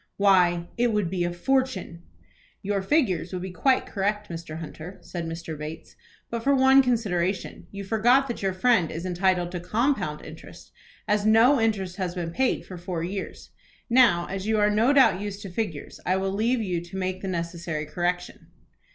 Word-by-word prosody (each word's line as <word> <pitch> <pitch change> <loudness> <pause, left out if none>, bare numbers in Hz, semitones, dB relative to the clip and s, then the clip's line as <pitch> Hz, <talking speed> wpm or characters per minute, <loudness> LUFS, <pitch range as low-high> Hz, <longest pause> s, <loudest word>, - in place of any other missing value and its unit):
Why, 180 -4 +3
it 240 -1 +3
would 205 -5 0
be 180 -2 0
a 175 - -1
fortune. 210 -3 -1 0.6
"Your 200 0 0
figures 190 - +1
would 185 -1 -4
be 190 - -5
quite 260 +8 +2
correct, 205 +1 -2
Mr. 165 -2 -7
Hunter" 165 +3 -8
said 170 -2 -6
Mr. 165 -1 -6
Bates, 155 +2 -8 0.4
"but 235 -1 -2
for 280 +2 +3
one 265 +1 +6
consideration. 195 -8 -1
You 200 0 -7
forget 240 +6 +3
that 240 - -5
your 195 -1 +1
friend 185 -3 +2
is 170 +3 -5
entitled 180 -1 +1
to 180 - -4
compound 195 - -1
interest, 155 +1 -12 0.4
as 210 0 +1
no 235 +5 +5
interest 195 -5 -1
has 185 -2 -3
been 170 -2 -3
paid 260 +9 0
for 185 - -9
four 175 -2 -4
years. 190 +3 -6 0.4
Now, 235 -9 +5
as 195 +1 -5
you 220 0 +2
are 210 0 +3
do 230 +5 +4
doubt 260 -10 +5
used 205 -1 -5
to 195 - -7
figures, 175 -7 -4
I 185 +1 +1
will 190 0 -1
leave 225 +4 +1
you 180 -4 -2
to 175 +2 -9
make 185 0 -3
the 195 - -4
necessary 170 -3 -3
correction." 175 +2 -3
190 Hz, 185 wpm, -25 LUFS, 175-220 Hz, 0.6 s, one